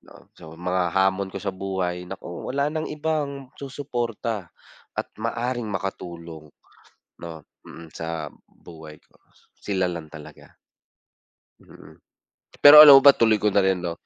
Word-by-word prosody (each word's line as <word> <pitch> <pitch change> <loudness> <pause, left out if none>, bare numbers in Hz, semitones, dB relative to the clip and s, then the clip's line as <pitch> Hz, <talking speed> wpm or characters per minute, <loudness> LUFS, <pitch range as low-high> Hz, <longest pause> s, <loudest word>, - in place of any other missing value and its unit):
'No. - - -19
So, 80 0 -14
mga 90 0 -2
hamon 95 0 +1
ko 95 - -10
sa 100 -2 -3
buhay, 90 -2 -4
naku, 85 -2 -9
wala 140 +3 -1
nang 155 0 -4
ibang 145 -3 -4
susuporta 120 - -5 0.5
at - - -4
maaaring 120 0 -3
makatulong, 85 -5 -7 0.7
'no, 85 -1 -8 0.3
mm, 85 -1 -13
sa 80 -1 -5 0.2
buhay 80 -3 -15
ko. - - -31 0.4
Sila 95 -3 -2
lang 85 -3 -8
talaga. 75 0 -14 1.1
Mm. - - -17 0.7
Pero 145 +1 +11
alam 150 -2 +11
mo - - -6
ba, 140 - +9
tuloy 115 -4 +2
ko 105 0 0
na 100 - +2
rin 95 -2 0
'no, 85 -1 -5
95 Hz, 140 wpm, -23 LUFS, 85-125 Hz, 1.1 s, Pero